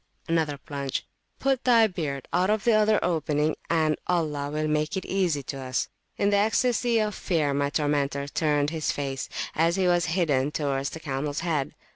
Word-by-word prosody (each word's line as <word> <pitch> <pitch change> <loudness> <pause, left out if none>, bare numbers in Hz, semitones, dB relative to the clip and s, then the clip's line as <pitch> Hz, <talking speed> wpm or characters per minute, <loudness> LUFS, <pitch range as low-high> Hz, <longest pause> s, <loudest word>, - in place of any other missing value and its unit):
(another 160 -3 0
plunge)put 145 - -4
thy 235 -3 +6
beard 150 - -3
out 180 +2 +2
of 215 -1 +1
the 235 - +4
other 215 0 +4
opening, 155 -2 0
and 155 -2 +2
Allah 150 -5 0
will 155 +1 -1
make 155 +3 0
it 190 - -4
easy 175 -7 0
to 135 +1 -6
us. 130 -1 -2 0.3
In 200 - +2
the 205 - +4
ecstasy 235 +3 +2
of 215 -1 +1
fear 155 -7 0
my 140 0 +1
tormentor 145 -1 0
turned 145 -1 +1
his 160 -2 -1
face, 135 -2 -4 0.2
as 165 +2 +2
he 190 -1 +1
was 175 -1 +2
bidden, 145 -7 +2
towards 140 -2 -1
the 160 - -8
camels 145 0 -3
head. 155 -5 -1
155 Hz, 175 wpm, -26 LUFS, 145-185 Hz, 0.3 s, thy